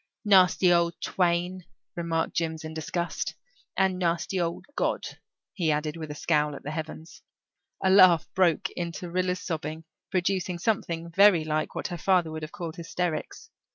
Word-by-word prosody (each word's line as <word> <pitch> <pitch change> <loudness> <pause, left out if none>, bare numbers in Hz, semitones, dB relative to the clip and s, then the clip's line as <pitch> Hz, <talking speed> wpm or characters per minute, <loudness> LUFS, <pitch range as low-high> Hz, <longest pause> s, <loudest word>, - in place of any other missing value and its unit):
"Nasty 185 -2 +5
old 170 -1 +1
twain," 180 0 0 0.3
remarked 165 -1 -1
Jims 160 -1 -2
in 155 0 -6
disgust. 170 +2 -3 0.4
"And 190 -1 +2
nasty 175 +1 0
old 170 0 -3
God," - - 0 0.5
he 170 -5 +1
added, 150 +1 -1
with 160 -2 -7
a 150 - -6
scowl 150 -1 +1
at - - -10
the 145 - -4
heavens. 160 +1 -7 0.6
A 190 - +4
laugh 185 -4 +7
broke 185 +1 +2
into 170 0 -5
Rilla's 180 0 -1
sobbing, 155 -1 -4 0.3
producing 185 -1 0
something 170 -4 -2
very 195 -2 +6
like 155 0 -2
what - - -3
her 175 -2 -5
father 180 -2 +2
would 155 0 -5
have 155 0 -6
called 165 -1 -6
hysterics. 170 -1 -4
170 Hz, 155 wpm, -27 LUFS, 160-185 Hz, 0.6 s, laugh